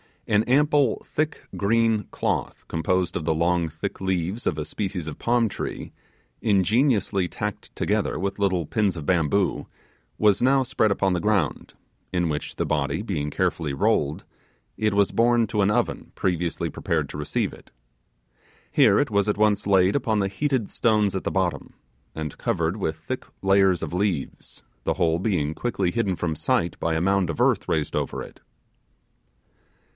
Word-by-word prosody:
An 105 0 +3
ample 145 -1 +3
thick 155 0 -2
green 115 +1 +2
cloth, - - -2
composed 90 +3 0
of 80 - -3
the 80 - +1
long 85 +1 +1
thick 80 +6 -5
leaves 95 +3 -1
of 75 - 0
a 75 - -3
species 95 -3 -3
of 75 - -7
palm 120 -1 +2
tree, - - -5 0.5
ingeniously 105 -2 +2
tacked 105 +2 -5
together - - 0
with 100 +1 -3
little 95 -4 +1
pins 100 +2 0
of 80 -4 -6
bamboo, 90 +3 +1 0.5
was 105 -2 +3
now 135 +2 +4
spread 110 -3 +1
upon 100 -1 +1
the 90 - 0
ground, 100 -7 0 0.4
in 90 -2 +1
which 75 -1 -4
the - - -1
body 75 +2 -1
being 75 -9 -2
carefully 75 0 -1
rolled, 70 +2 +1 0.5
it 110 -1 +1
was 100 -1 +3
borne 120 0 +3
to 105 0 0
an 100 - +3
oven 105 - -1
previously 85 -2 -1
prepared - - -2
to - - -7
receive 75 - -1
it. - - -15 1.0
Here - - +5
it - - 0
was 100 0 +2
at 105 - 0
once 105 -1 +2
laid 95 -1 +4
upon 110 -6 +1
the 100 -1 0
heated 130 +1 -1
stones 105 -4 +2
at 95 - -3
the - - +1
bottom, 95 -3 -2 0.4
and 80 -2 -5
covered 85 +4 0
with 80 -6 -2
thick 125 +12 -6 0.2
layers 95 -3 +4
of 80 - -4
leaves, 90 -6 -3 0.2
the - - +1
whole 85 -2 +1
being 90 -7 0
quickly 95 -4 -1
hidden 100 -4 0
from 80 -2 -2
sight 85 +2 0
by 80 -1 0
a 80 - 0
mound 95 -1 +2
of 85 - -2
earth - - +2
raised 75 -2 -1
over - - -2
it. - - -13
95 Hz, 170 wpm, -24 LUFS, 85-105 Hz, 1.0 s, Here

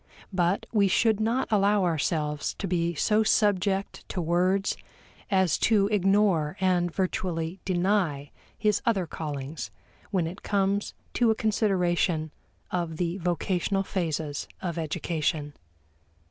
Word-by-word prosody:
But 180 +1 +1
we 205 -3 +4
should 220 +2 +3
not 230 +4 +1
allow 205 -1 +3
ourselves 150 -3 -1
to 200 - -4
be 170 -1 0
so 210 +8 +3
subject 200 -2 +1
to - - -3
words 180 +4 +1 0.5
as 190 -5 +2
to 205 -3 +3
ignore 195 -5 +2
and 180 -2 +2
virtually 180 -1 -2
deny 180 -6 0 0.3
his 210 -2 +1
other 200 -6 +1
callings 150 -2 -5 0.4
when 185 -4 +1
it 170 +3 -6
comes 200 0 0 0.2
to 240 -2 +3
a 220 - +3
consideration 180 -7 +1 0.4
of 170 -3 -2
the 175 +1 -1
vocational 180 +2 0
phases 160 -6 -2
of 170 -2 -3
education. 155 -1 -2
185 Hz, 120 wpm, -27 LUFS, 165-200 Hz, 0.5 s, we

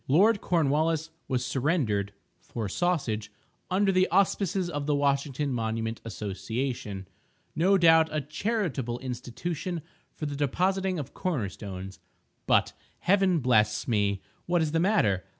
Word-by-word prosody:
Lord 200 +9 +4
Cornwallis 160 0 +1 0.2
was 125 -2 -1
surrendered 130 - 0 0.3
(for 110 -3 -5
sausage) 110 - -1 0.4
"under 195 +2 +3
the 185 0 +3
auspices 195 -1 +1
of 145 -4 -3
the 150 - +2
Washington 140 0 0
Monument 115 -1 -2
Association"—no 110 - -2
doubt 165 -2 +6
a 155 - 0
charitable 150 - -2
institution 145 +7 -4 0.3
for 155 - -4
the 145 -1 -3
depositing 185 +7 0
of 145 -5 -6
corner 145 - -1
stones.—But, 95 -1 -3 0.3
Heaven 185 -3 +3
bless 110 -4 +2
me! 100 -4 +1 0.2
what 175 -1 +2
is 155 - -1
the 165 - +1
matter? 135 - +2
145 Hz, 120 wpm, -28 LUFS, 115-175 Hz, 0.4 s, doubt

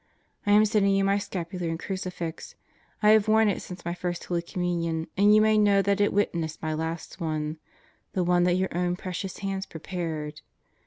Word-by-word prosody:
I - - +4
am 210 +1 +7
sending 205 -2 +3
you 195 - +2
my 195 +1 +2
scapular 180 -2 -4
and 165 - -2
crucifix. 185 - -5 0.5
I 210 - +6
have 215 -1 +5
worn 220 0 +5
it 195 - -2
since 180 -2 -9
my 170 - -1
First 175 -1 -4
Holy 175 -1 -1
Communion 170 -2 -2
and 205 +2 +5
you 215 - +6
may 215 0 +4
know 200 -1 +4
that 200 +1 +1
it 205 - +3
witnessed 170 -6 -1
my 155 -1 -2
last 160 +1 -4
one 155 -1 -2 0.5
the 185 - +1
one 175 0 +3
that 180 0 +3
your 190 0 -1
own 175 0 0
precious 185 +1 -5
hands 195 -1 -3
prepared. 160 -3 -5
180 Hz, 195 wpm, -27 LUFS, 170-200 Hz, 0.5 s, am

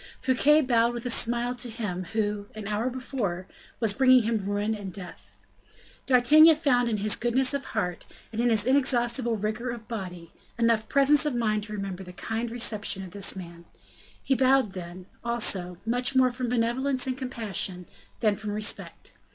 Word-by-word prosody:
Fouquet 280 +4 +3
bowed 240 -3 +1
with 240 +1 -6
a 245 - +2
smile 240 +1 +2
to 245 0 -2
him 205 -6 -5
who, 210 -2 -2
an 215 -2 -7
hour 215 +4 -1
before, 240 -8 -4 0.3
was 225 -3 +2
bringing 255 0 +5
him 225 0 0
ruin 205 +2 -2
and 205 -3 -7
death. 180 -2 -10 0.7
D'Artagnan 300 +6 +6
found 250 -6 +1
in 215 - -1
his 210 +1 +2
goodness 250 +3 +2
of 280 -1 -3
heart, 180 -1 -4 0.2
and 225 +1 -3
in 240 - +2
his 220 -3 +3
inexhaustible 240 -3 +2
vigor 215 +4 -3
of 235 -2 -7
body, 180 -7 -7 0.3
enough 230 -2 +1
presence 285 +2 +4
of 280 - -2
mind 215 -3 -1
to 215 - -9
remember 195 -2 -5
the 180 -1 -11
kind 225 +5 -4
reception 210 -4 0
of 185 - -10
this 200 +1 0
man; 170 -2 -10 0.6
he 275 - +1
bowed 260 -4 +3
then, 180 0 -9 0.2
also, 200 -7 +1
much 245 +3 0
more 255 -1 +4
from 245 0 -4
benevolence 250 +3 0
and 260 -1 -2
compassion, 215 -8 -3 0.4
than 215 -3 +3
from 210 0 -6
respect. 210 0 -1
230 Hz, 175 wpm, -26 LUFS, 205-250 Hz, 0.7 s, D'Artagnan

